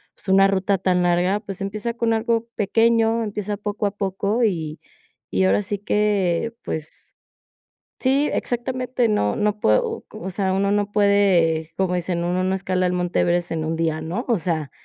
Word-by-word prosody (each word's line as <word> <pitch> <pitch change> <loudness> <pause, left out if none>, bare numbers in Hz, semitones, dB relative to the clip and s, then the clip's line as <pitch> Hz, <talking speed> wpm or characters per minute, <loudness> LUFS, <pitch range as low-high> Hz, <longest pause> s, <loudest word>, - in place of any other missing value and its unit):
pues, - - -12
una 195 +1 +6
ruta 195 0 +1
tan 180 -1 +1
larga, 175 +3 +2
pues, 195 -2 -7
empieza 215 +4 -3
con 230 -1 +1
algo 230 +1 0
pequeño. 225 +2 +2
Empieza 210 -1 -3
poco 205 0 -3
a - - -2
poco, 200 +3 -1
y 160 -7 -1 0.5
y 95 0 +2
ahora 100 +2 +3
sí 205 - -3
que 205 -1 0
pues 155 0 -7 0.9
Sí, 275 +3 +2
exactamente. 250 0 -1
No, 105 - +1
no 210 0 0
puedo - - +3
o 450 0 -6 0.2
o 190 - -3
sea, 190 0 -1
uno 195 +1 +1
no 205 0 0
puede 185 -6 +3
como 185 -1 0
dicen: 175 -1 -2
"Uno 180 +1 0
no 190 - +1
escala 185 -1 0
el 180 - 0
Monte 180 -1 0
Everest 175 0 +1
en 160 -1 -2
un 160 +1 -2
día, 160 -1 -1
¿no?" 180 +10 -3
O 235 -4 +2
sea, 160 -4 -2
195 Hz, 180 wpm, -22 LUFS, 175-215 Hz, 0.9 s, una